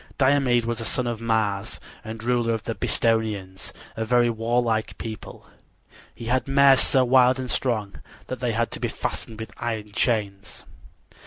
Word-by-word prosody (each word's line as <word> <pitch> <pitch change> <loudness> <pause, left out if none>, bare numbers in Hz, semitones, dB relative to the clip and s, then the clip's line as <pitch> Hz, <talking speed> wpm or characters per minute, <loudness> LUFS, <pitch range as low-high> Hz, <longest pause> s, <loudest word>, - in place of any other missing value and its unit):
Diomede 130 -3 +3
was 120 -1 -2
a - - -3
son 125 - -1
of 120 -2 -3
Mars 110 -2 -1 0.2
and 110 0 -7
ruler 120 -1 +1
of 110 - -6
the 115 - -3
Bistonians, 105 -3 -1 0.2
a 110 - -2
very 120 +1 +3
warlike 115 -1 0
people. 110 -1 -8 0.7
He 115 - -9
had 125 +2 0
mares 135 -1 +6
so 130 -2 +4
wild 125 0 +5
and 130 -1 -4
strong 110 -6 -2 0.2
that 130 - -5
they 125 -2 -1
had 115 +1 0
to - - -6
be - - -1
fastened 110 -1 -5
with 110 0 -7
iron 110 -3 -4
chains. 105 -3 -1
115 Hz, 165 wpm, -24 LUFS, 110-125 Hz, 0.7 s, mares